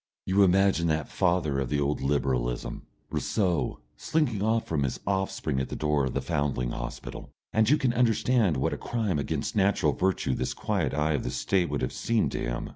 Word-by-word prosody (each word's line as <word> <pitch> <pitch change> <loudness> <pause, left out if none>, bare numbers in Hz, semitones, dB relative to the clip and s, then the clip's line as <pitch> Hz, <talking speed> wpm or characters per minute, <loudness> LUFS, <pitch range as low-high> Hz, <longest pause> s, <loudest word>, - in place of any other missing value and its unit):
You 95 +2 +3
imagine 95 -2 +4
that 80 -2 0
father 85 -6 +1
of 65 -3 -2
the 75 - 0
old 70 +1 0
Liberalism, 65 -4 -1 0.2
Rousseau, 90 -7 0 0.2
slinking 135 -11 0
off 110 +2 +1
from 80 -3 -1
his 65 -2 -1
offspring 95 -8 -1
at 65 - -3
the - - -4
door 75 -2 +1
of 65 - -4
the - - -1
Foundling 65 -4 -1
Hospital, - - -6 0.2
and 110 +1 +3
you 150 - +5
can 125 -4 +1
understand 115 - +2
what 65 - 0
a - - -3
crime 110 -9 -1
against 70 - -2
natural 95 -7 +3
virtue 95 -7 0
this - - -2
quiet - - -1
eye 75 +1 +1
of 70 - -1
the - - -2
State 90 +7 0
would 70 -2 -2
have 65 - -2
seemed 115 -2 0
to - - -3
him. - - -3
80 Hz, 200 wpm, -27 LUFS, 70-100 Hz, 0.2 s, you